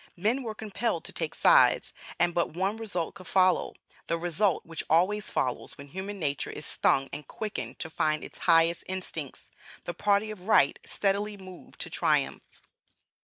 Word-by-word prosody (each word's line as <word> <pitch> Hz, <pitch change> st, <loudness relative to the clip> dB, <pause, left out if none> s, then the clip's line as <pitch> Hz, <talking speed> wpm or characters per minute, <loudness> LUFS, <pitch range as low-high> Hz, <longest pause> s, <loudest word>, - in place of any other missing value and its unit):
Men 220 Hz, +9 st, +1 dB
were 225 Hz, -4 st, -5 dB
compelled 220 Hz, +2 st, -2 dB
to -, -, -5 dB
take -, -, -3 dB
sides, -, -, +5 dB, 0.2 s
and 175 Hz, 0 st, +2 dB
but 170 Hz, -, +1 dB
one 190 Hz, +4 st, 0 dB
result 205 Hz, -7 st, -3 dB
could 185 Hz, -, -12 dB
follow, 185 Hz, -1 st, +3 dB, 0.3 s
(the 165 Hz, -, 0 dB
result 175 Hz, +2 st, 0 dB
which 165 Hz, -1 st, -5 dB
always 195 Hz, +6 st, +2 dB
follows 125 Hz, -2 st, -2 dB
when 140 Hz, 0 st, -11 dB
human 190 Hz, +5 st, -5 dB
nature 145 Hz, -6 st, -1 dB
is 150 Hz, -, -6 dB
stung 135 Hz, 0 st, +2 dB
and 145 Hz, 0 st, -6 dB
quickened 215 Hz, -2 st, -5 dB
to -, -, -4 dB
find 155 Hz, -1 st, 0 dB
its -, -, -7 dB
highest 165 Hz, 0 st, +5 dB
instincts,) 180 Hz, -6 st, -5 dB, 0.3 s
the 175 Hz, -, -4 dB
Party 205 Hz, +4 st, +1 dB
of 195 Hz, -2 st, -10 dB
Right 140 Hz, -10 st, +4 dB
steadily 205 Hz, +1 st, 0 dB
moved 185 Hz, -2 st, -13 dB
to -, -, -2 dB
triumph. -, -, +1 dB
185 Hz, 170 wpm, -28 LUFS, 165-205 Hz, 0.3 s, sides